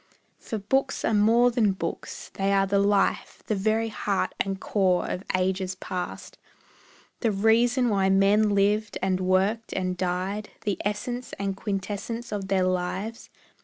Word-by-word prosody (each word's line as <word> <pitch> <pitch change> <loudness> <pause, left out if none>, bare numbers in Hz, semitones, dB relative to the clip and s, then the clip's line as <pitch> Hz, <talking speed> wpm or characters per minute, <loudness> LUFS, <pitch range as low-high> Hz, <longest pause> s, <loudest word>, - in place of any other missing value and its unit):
For 220 - -5
books 265 +7 0
are - - +1
more 230 +4 +4
than 220 -5 +2
books, 170 -3 -6
they 195 0 0
are 195 0 +3
the 200 +1 +1
life, 200 0 +1
The - - -1
very 220 +3 +1
heart 205 -2 -1
and 195 -1 -1
core 190 -4 +1
of 185 - -4
ages 185 0 -1
past, 180 -1 -6 0.8
The 230 - +1
reason 235 +5 +3
why 195 -3 +2
men 200 +2 +4
lived, 205 +2 +1
and 190 -1 +1
worked, 190 +5 +1
and 185 -1 -1
died, 185 +3 -2
The 205 -2 -1
essence 240 +4 -3
and 195 -1 -2
quintessence 205 +4 -4
of 200 -2 -3
their 190 -1 +2
lives. 185 +5 -2
200 Hz, 150 wpm, -26 LUFS, 190-220 Hz, 0.8 s, more